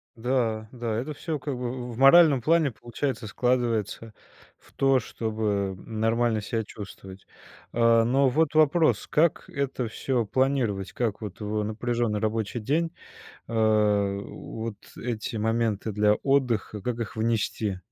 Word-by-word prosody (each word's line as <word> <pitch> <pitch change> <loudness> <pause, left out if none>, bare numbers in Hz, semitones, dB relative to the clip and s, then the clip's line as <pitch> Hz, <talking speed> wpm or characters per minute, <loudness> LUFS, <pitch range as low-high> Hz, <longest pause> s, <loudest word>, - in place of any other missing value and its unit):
Да, 115 -2 -1
да, 120 -3 -3
это 145 +5 -4
всё, 155 +1 -4
как 140 0 -4
бы, 125 -1 -3 0.2
в - - -6
в - - -9
моральном 140 +1 +7
плане, 160 +1 +3
получается, 120 +1 -4
складывается 115 -2 -1 0.5
в - - -23
то, 135 -1 +3
чтобы 105 -4 -2
нормально 115 +1 +1
себя 110 +2 -2
чувствовать. 95 -2 -10 0.5
А, 115 -1 +4
но 130 +3 +3
вот 155 +3 +1
вопрос: 155 +1 +3
как 155 +1 +1
это 135 -3 -2
всё 120 +2 -1
планировать? 120 -7 0
Как 115 -4 -2
вот 105 -3 -7
в 105 0 -2
напряженный 115 0 -1
рабочий 110 +1 -1
день, 160 +9 0 0.6
а, 105 -3 +2
вот 110 +2 -7 0.2
эти 115 -2 -4
моменты 110 -1 0
для 105 +1 +3
отдыха, 120 -5 0
как 120 +3 -2
их 115 -3 -4
внести? 110 -3 -1
115 Hz, 135 wpm, -26 LUFS, 110-130 Hz, 0.6 s, моральном